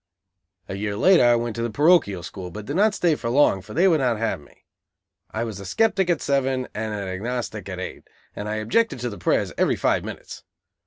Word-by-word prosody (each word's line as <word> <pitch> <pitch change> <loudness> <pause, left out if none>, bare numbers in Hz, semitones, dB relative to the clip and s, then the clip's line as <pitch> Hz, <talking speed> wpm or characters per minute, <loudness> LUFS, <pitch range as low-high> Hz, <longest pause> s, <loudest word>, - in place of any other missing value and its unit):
A - - -5
year 100 +1 -3
later 180 - +5
I 120 0 +5
went 120 -1 -2
to - - -2
the 120 - -1
parochial 145 - +3
school, 95 -2 -7
but 105 +4 -8
did 140 - -4
not 205 +2 +3
stay 170 -3 +2
long, 120 -5 +2
for 105 +3 -11
they 180 +5 +4
would 165 -4 +4
not 125 -4 +1
have 115 -8 -2
me. 70 - -22 0.6
I 110 - -3
was 110 -4 -5
a 100 - -8
sceptic 195 - +2
at 170 -4 +1
seven 135 -2 0
and 110 0 -3
an 100 -2 -4
agnostic 105 +1 -4
at 95 -1 -5
eight, 95 - -7 0.3
and 105 +1 -5
I 105 - -2
objected 120 - +1
to 120 -1 -2
the 100 - -9
prayers - - 0
every - - +3
five - - +1
minutes. - - -8
115 Hz, 220 wpm, -23 LUFS, 100-145 Hz, 0.6 s, later